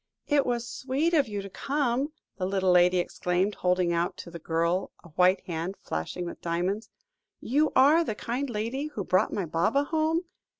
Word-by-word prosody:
"It 290 -3 +2
was 240 -1 -1
sweet 275 +8 -1
of 290 -5 +4
you 205 -2 -4
to 195 - -8
come," 275 +2 -1 0.3
the 185 -1 -1
little 190 -1 +2
lady 180 +1 +5
exclaimed, 180 +2 0
holding 180 -2 +1
out 170 +1 -1
to 170 - -9
the 170 - -8
girl 170 +3 0
a 175 - -14
white 180 +4 +3
hand 175 +1 -4
flashing 80 - -4
with 170 - -7
diamonds, 180 +6 -2 0.5
"you 295 +6 +1
are 290 +6 +6
the 220 - -3
kind 255 +6 -3
lady 235 +6 -2
who 225 -10 -5
brought 185 +3 +2
my 195 - -2
Baba 170 - +1
home? 320 +3 0
200 Hz, 180 wpm, -27 LUFS, 180-270 Hz, 0.5 s, are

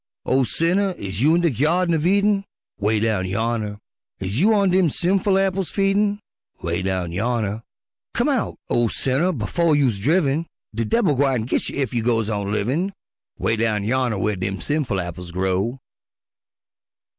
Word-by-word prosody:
Oh, 130 +1 +3
sinner, 180 +8 +1
is 95 +1 -4
you 155 +4 +5
in 175 - +2
de 170 -2 +2
Gyardin 165 - +1
uv 160 +1 +1
Eden? 200 +1 +3 0.4
('Way 105 +1 +1
down 110 -4 0
yonner) 110 +1 -2 0.4
Is 95 +5 -2
you 205 +6 +4
on 200 -3 +3
dem 185 -2 +4
sinful 190 +5 +1
apples 195 -1 0
feedin'? 200 +1 +1 0.4
('Way 85 +2 -2
down 95 -2 -2
yonner) 110 +2 -1 0.5
Come - - +2
out, - - 0
oh, 120 -1 +2
sinner, 135 - 0
befo' 165 +5 0
youse 130 -8 +2
driven, 155 - +1 0.3
De 115 +1 -1
debil 195 - +2
gwine 135 -3 +1
git 125 - -1
you - - -5
ef 130 -4 -1
you 120 - +1
goes 115 -2 +1
on 100 -1 -2
livin' 135 - -1 0.4
'Way 115 - 0
down 110 -2 0
yonner 120 0 0
whar 105 +2 0
dem 95 0 -3
sinful 145 -10 -1
apples 90 0 -6
grow! 95 +7 -1
125 Hz, 165 wpm, -22 LUFS, 105-175 Hz, 0.5 s, you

